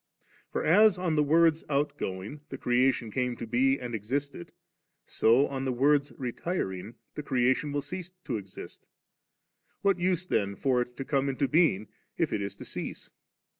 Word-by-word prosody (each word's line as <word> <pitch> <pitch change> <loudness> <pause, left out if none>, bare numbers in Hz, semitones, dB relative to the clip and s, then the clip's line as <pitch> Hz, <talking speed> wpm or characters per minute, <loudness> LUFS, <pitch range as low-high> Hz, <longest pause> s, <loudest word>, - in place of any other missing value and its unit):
For, - - -2
as 205 +4 +6
on 180 -3 0
the 150 - +3
Word's 160 +2 +4
outgoing, 140 -4 -2
the 135 - -6
creation 125 -2 +1
came 125 +1 -1
to - - -5
be, 130 +4 +2
and 125 -2 -6
existed, 130 0 -3 0.5
so 120 +5 +4
on 135 -2 -4
the 130 - 0
Word's 140 +3 +2
retiring, 115 - -3 0.2
the - - -5
creation 130 +1 +1
will 145 -1 -2
not 185 -3 -6
exist 100 -3 -9 1.0
What 195 -2 +3
use 180 0 +1
then 100 - 0
for 125 +4 +1
it 125 0 -6
to 135 - -4
come 140 0 +1
into 135 +1 0
being, 150 - +3 0.3
if - - 0
it 100 - -1
is 100 0 -4
to - - -10
cease - - -7
135 Hz, 165 wpm, -29 LUFS, 120-150 Hz, 1.0 s, as